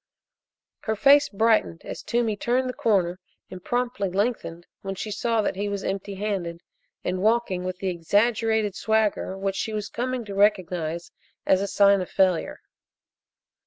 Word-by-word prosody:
Her 220 - 0
face 280 +5 +5
brightened 220 -5 +1
as - - -6
Toomey 235 -2 0
turned 250 +5 0
the 250 - -3
corner 185 -7 +1 0.3
and 180 -1 -9
promptly 245 -4 -1
lengthened 190 -4 -2 0.2
when 195 0 -4
she 215 +3 -5
saw 230 +1 0
that - - -1
he 205 +2 -2
was 200 -1 -3
empty 195 +1 -3
handed 185 -4 -3 0.4
and 185 +1 -2
walking 215 -4 +1
with 185 0 -4
the 190 0 -2
exaggerated 210 +4 +1
swagger 215 -2 0
which 195 0 -2
she 220 - -3
was 210 -1 -3
coming 250 0 -3
to 200 - -7
recognize 180 -5 0 0.3
as 190 0 +3
a 200 - -1
sign 200 -1 +4
of 180 - -5
failure. 185 -3 +1
200 Hz, 160 wpm, -25 LUFS, 185-225 Hz, 0.4 s, face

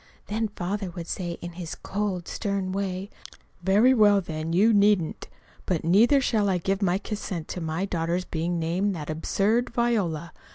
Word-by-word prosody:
Then 220 +1 -1
Father 190 +2 -3
would 170 -1 -7
say 175 0 -3
in 175 - -6
his 170 -1 -6
cold, 195 -4 -3
stern 200 -3 -2
way: 195 0 -3 0.5
"Very 205 +8 +5
well, 205 -4 +5
then, 160 -3 -4
you 210 +7 +4
needn't. 205 -5 +2 0.4
But 180 -4 0
neither 225 - +5
shall 215 -6 +1
I 185 - +2
give 195 +3 -1
my 185 -2 +2
consent 195 -5 -5
to 180 - -4
my 160 +4 -2
daughter's 175 -1 -1
being 170 +2 -2
named 180 +5 0
that 155 -2 -5
absurd 205 +9 +1
Viola. 200 -10 0
190 Hz, 165 wpm, -26 LUFS, 170-205 Hz, 0.5 s, Very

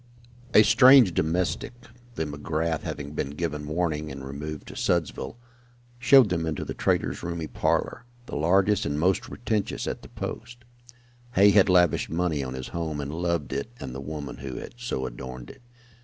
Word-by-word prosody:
A 105 - +9
strange 120 -1 +7
domestic 85 +9 -1 0.4
(the 80 - -1
McGrath 80 +2 -2
having 70 -1 -5
been 70 - -2
given 75 -3 -3
warning 80 -2 -1
and 65 0 -7
removed 75 +3 -6
to - - -10
Sudsville) 85 - -1 0.6
showed 130 -3 +6
them 80 -2 -1
into 80 -2 -3
the - - -4
trader's - - 0
roomy 85 -2 -4
parlor, - - -1 0.2
the - - -7
largest 95 +6 +3
and 70 +1 -2
most 90 +4 +2
pretentious 110 -4 -3
at - - -4
the - - -13
post. 120 +1 -7 0.7
Hay 100 0 +6
had 100 -1 +5
lavished 90 -4 +3
money 80 -3 -1
on 65 0 -5
his 65 -1 -6
home 80 -3 -3
and 70 +1 -4
loved 85 -4 -1
it 70 +9 -3
and 65 -2 -6
the 65 - -6
woman 75 -1 -6
who 65 -2 -6
had - - -7
so 120 - -3
adorned 65 0 -8
it. 130 - -18
80 Hz, 170 wpm, -26 LUFS, 75-95 Hz, 0.7 s, A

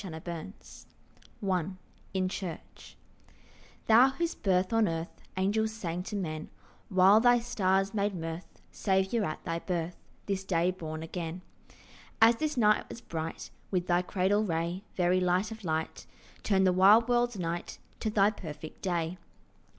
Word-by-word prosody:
CHRISTMAS 170 +1 -8 0.6
ANTIPHONES - - -2
I 180 -3 +1 0.5
IN 185 -1 +1
CHURCH 185 -3 -7 0.9
THOU 235 +4 +7
whose 340 -1 0
birth 185 +1 +1
on 225 -2 +4
earth 165 +1 -4 0.2
Angels 215 +3 +1
sang 180 -5 -4
to 200 +3 -6
men, 155 -5 -4 0.4
While 190 +2 +6
thy 245 +1 +5
stars 195 -5 +1
made 205 -1 0
mirth, 165 +1 -5 0.2
Saviour, 190 +3 +1
at 155 -5 -4
thy 165 -1 -2
birth, 175 -1 -3 0.3
This 195 -1 -2
day 180 -1 +1
born 160 -3 -6
again; 170 +1 -5 0.8
As 230 0 +6
this 305 -1 -2
night 210 -3 +3
was - - -8
bright 160 -4 -5 0.2
With 180 -2 0
thy 175 0 +2
cradle 190 +3 +1
ray, 170 0 -2
Very 180 0 +3
light 180 +4 +1
of 220 -1 -8
light, 160 -2 -3 0.3
Turn 195 -2 +2
the 185 -1 +4
wild 205 +5 +6
world's 240 -2 +1
night 170 -1 -4 0.2
To 220 - -1
thy 205 -1 +4
perfect 160 -6 -9
day. 175 -1 -2
185 Hz, 150 wpm, -30 LUFS, 170-210 Hz, 0.9 s, THOU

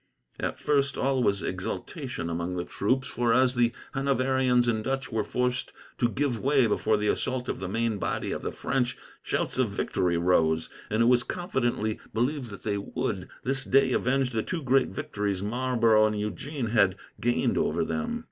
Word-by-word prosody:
At - - -2
first, 140 -1 +1
all 135 -1 +1
was 100 -4 +1
exultation 85 - -4
among 85 +2 -2
the 90 0 -2
troops, 130 +6 0
for 120 -1 +1
as 130 0 +4
the 120 -1 +3 0.2
Hanoverians 130 -2 +2
and 110 -2 +1
Dutch 135 +1 -2
were 110 -2 0
forced 125 +3 -1 0.3
to 120 - +3
give 130 -2 -1
way 135 0 +3
before 110 0 +2
the 105 0 -1
assault 130 +3 -1
of - - -3
the 95 - -4
main 115 0 0
body - - -2
of - - -3
the - - -3
French, 125 -2 -1 0.2
shouts - - -1
of - - +3
victory 85 -2 0
rose; 80 -2 +2 0.2
and 110 +2 +2
it - - +4
was 125 0 +5
confidently 120 - -1 0.2
believed 125 +2 0
that 100 - -10
they 100 -2 -1
would, 100 -3 -3
this 135 +1 -1
day, 135 -1 +3
avenge 130 +1 +1
the 110 -2 0
two 165 +6 -4
great 130 0 +3
victories 105 -10 -3
Marlborough 115 -1 +3
and 105 -1 -2
Eugene 115 - -3
had 100 -5 +4 0.2
gained 120 +1 +1
over 210 0 +1
them. 235 +2 -2
120 Hz, 180 wpm, -27 LUFS, 105-135 Hz, 0.3 s, was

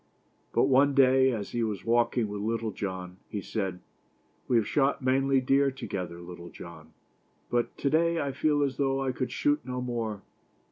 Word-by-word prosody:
But - - +3
one 140 +1 +4
day, 130 -1 +5
as 105 -4 -4
he 120 - -1
was 105 -4 -2
walking 120 0 +2
with 105 0 -5
Little 115 +1 -1
John, 95 -3 -5
he 105 - -3
said: 95 -2 -3 0.7
"We 125 - +2
have 110 - +2
shot 140 -2 +1
many 135 +1 +3
deer 135 +2 +3
together, 95 -10 -5
Luctle 85 0 -10
John, 80 -2 -12 0.6
but 120 -1 0
to 140 - 0
day 170 +1 +2
I 140 -2 -1
feel 145 +2 +1
as 135 -2 -1
though 135 -1 +1
I 130 - 0
could 130 0 -3
shoot 145 +1 +1
no 125 0 -4
more." 115 -5 -3
125 Hz, 180 wpm, -28 LUFS, 100-135 Hz, 0.7 s, day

